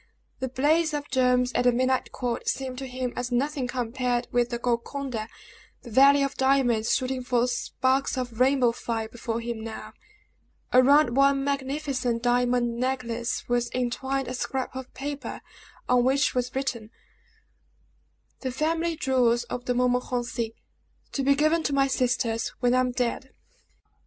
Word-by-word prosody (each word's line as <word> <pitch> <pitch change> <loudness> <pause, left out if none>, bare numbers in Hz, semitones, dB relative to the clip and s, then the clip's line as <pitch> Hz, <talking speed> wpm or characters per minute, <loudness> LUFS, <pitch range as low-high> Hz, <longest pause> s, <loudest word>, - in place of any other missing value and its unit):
The 260 0 -2
blaze 300 +5 +2
of 290 0 -5
gems 250 -1 +2
at 245 - +1
the 245 - +6
midnight 255 +2 0
court 245 -2 -3
seemed 260 -1 -3
to 270 - -5
him 250 -1 -4
as 245 0 -3
nothing 270 +1 0
compared 245 0 -1
with 240 0 +2
the 240 - -2
Golconda, 240 -1 -2 0.6
the 240 - -10
Valley 275 +4 +6
of 275 0 -1
Diamonds 260 -4 +2
shooting 255 -1 -2
forth 245 0 +1
sparks 260 +2 0
of 245 -3 -4
rainbow 255 -2 +4
fire 230 -1 -3
before 230 0 -4
him 230 -1 -5
now. 225 -1 -7 0.8
Around 255 0 +5
one 275 0 +4
magnificent 275 -3 -2
diamond 245 -1 +1
necklace 245 -2 -2
was 240 0 0
entwined 265 +2 -1
a 255 - -4
scrap 260 0 -3
of 260 -1 -7
paper, 285 +1 -5 0.5
on 250 -1 +4
which 265 +2 +2
was 250 0 -2
written: 250 -5 -3 1.5
"The 260 - -3
family 325 +5 0
jewels 245 -5 +2
of 245 0 -5
the 245 - 0
Montmorencis. 245 -2 0 0.6
To 275 - -2
be 280 +1 +4
given 310 +3 +2
to 290 - -1
my 275 0 +4
sisters 245 -3 0
when 245 -1 +2
I 255 - +4
am 255 0 +2
dead." 250 +2 -3
255 Hz, 150 wpm, -26 LUFS, 240-270 Hz, 1.5 s, the